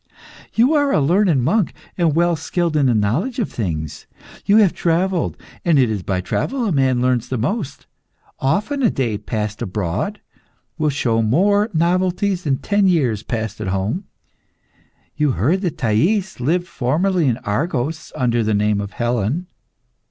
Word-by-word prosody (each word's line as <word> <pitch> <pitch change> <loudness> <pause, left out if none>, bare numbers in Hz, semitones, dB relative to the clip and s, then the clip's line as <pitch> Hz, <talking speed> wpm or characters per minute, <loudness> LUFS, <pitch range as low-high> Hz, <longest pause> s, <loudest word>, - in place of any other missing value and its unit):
You 245 +7 +4
are 285 -2 +2
a - - +3
learned 165 -2 +3
monk, 205 - +1 0.2
and 165 -4 +1
well 170 0 +3
skilled 170 +1 -1
in 145 -3 +3
the 120 - +2
knowledge 125 - 0
of 230 - -2
things. 80 - -4 0.4
You 205 - +5
have 205 -5 +5
travelled, 175 +1 0 0.3
and 165 -4 +3
it 125 -4 +3
is 105 -3 -2
by 95 0 -2
travel 250 - -2
a 210 - 0
man 130 -4 +2
learns 125 -2 +1
the 130 - -1
most. 155 - -3 0.5
Often 210 - 0
a 235 - +4
day 115 -6 -1
passed 105 0 -4
abroad 105 - -2 0.6
will 155 -1 +2
show 120 -5 +1
more 200 - +2
novelties 180 +2 0
than 135 -3 +1
ten 205 +4 +1
years 130 - +1
passed 110 -2 -4
at 105 - -3
home. 100 - -2 1.1
You 150 -3 +2
have - - -7
heard 155 - +1
that 175 -6 -2
Thais 170 - +1
lived 170 +8 0
formerly 170 +3 0
in 120 -3 +1
Argos, 150 +6 -2
under 120 -2 +1
the 110 -1 +1
name 105 0 +1
of 100 0 -7
Helen. 120 - -1
145 Hz, 165 wpm, -20 LUFS, 115-185 Hz, 1.1 s, You